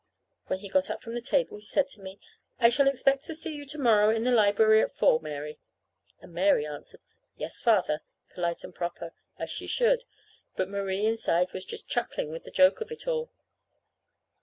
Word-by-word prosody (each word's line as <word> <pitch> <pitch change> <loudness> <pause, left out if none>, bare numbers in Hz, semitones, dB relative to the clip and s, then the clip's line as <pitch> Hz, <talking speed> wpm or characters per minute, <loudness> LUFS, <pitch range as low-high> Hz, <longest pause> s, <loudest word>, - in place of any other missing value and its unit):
When 185 - -1
he 205 - -7
got 280 +7 +1
up - - -5
from 230 - -7
the 240 - -3
table 255 -2 0
he 210 - -15
said 275 +6 +1
to 210 - -11
me: 190 +1 -9 0.4
"I 235 -2 +7
shall 275 +4 +3
expect 275 0 +2
to 325 - -4
see 320 0 -5
you 290 -1 -8
to 300 +2 -7
morrow 220 -6 +4
in 225 0 +1
the 250 - +2
library 220 -1 +5
at - - -3
four, 155 - +4
Mary." 150 -1 -6 0.6
And - - -15
Mary 180 -3 +3
answered, 150 -1 -9 0.4
"Yes, - - -6
Father," 190 -10 +2 0.3
polite 170 -1 -2
and - - -9
proper, 170 -1 -5 0.2
as - - -5
she - - -5
should; - - +2 0.5
but 185 0 -1
Marie 200 0 -1
inside 185 -5 +1
was 185 0 -5
just - - -8
chuckling 235 -10 -2
with 165 - -8
the - - -9
joke 280 +12 +4
of 450 - -5
it 465 - -8
all. 480 -1 -1
220 Hz, 200 wpm, -28 LUFS, 185-275 Hz, 0.6 s, I